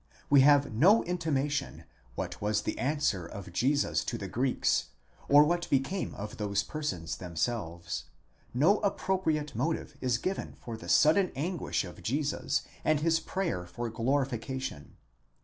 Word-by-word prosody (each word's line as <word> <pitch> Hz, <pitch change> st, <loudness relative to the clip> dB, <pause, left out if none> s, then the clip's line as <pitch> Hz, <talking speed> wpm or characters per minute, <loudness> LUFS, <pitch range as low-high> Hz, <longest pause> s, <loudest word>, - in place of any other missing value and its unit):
We 140 Hz, -2 st, +8 dB
have 145 Hz, -2 st, +5 dB
no 185 Hz, -, +5 dB
intimation 150 Hz, -5 st, -1 dB, 0.3 s
what -, -, -5 dB
was 105 Hz, +1 st, 0 dB
the -, -, -3 dB
answer 135 Hz, -, 0 dB
of 95 Hz, -1 st, -9 dB
Jesus 140 Hz, +9 st, +1 dB
to 120 Hz, -, -2 dB
the 100 Hz, -, -5 dB
Greeks, 120 Hz, -, +1 dB, 0.4 s
or 145 Hz, +1 st, +8 dB
what 175 Hz, +3 st, 0 dB
became 140 Hz, +8 st, 0 dB
of 105 Hz, +1 st, -7 dB
those 100 Hz, -2 st, 0 dB
per 155 Hz, -, -6 dB
sons 85 Hz, -, -3 dB
themselves; 90 Hz, -1 st, -3 dB, 0.5 s
no 165 Hz, -, +4 dB
appropriate 185 Hz, -7 st, 0 dB
motive 150 Hz, +5 st, -2 dB
is 125 Hz, -2 st, +1 dB
given 185 Hz, +10 st, -3 dB
for 115 Hz, -, -6 dB
the 110 Hz, -, -9 dB
sudden 175 Hz, +5 st, +5 dB
anguish 170 Hz, +5 st, -1 dB
of 90 Hz, -1 st, -10 dB
Jesus 140 Hz, -, -1 dB, 0.2 s
and 155 Hz, -1 st, +2 dB
his 165 Hz, +1 st, +3 dB
prayer 165 Hz, -, -3 dB
for 120 Hz, +5 st, -5 dB
glorification. 130 Hz, -, -2 dB
135 Hz, 145 wpm, -30 LUFS, 105-155 Hz, 0.5 s, We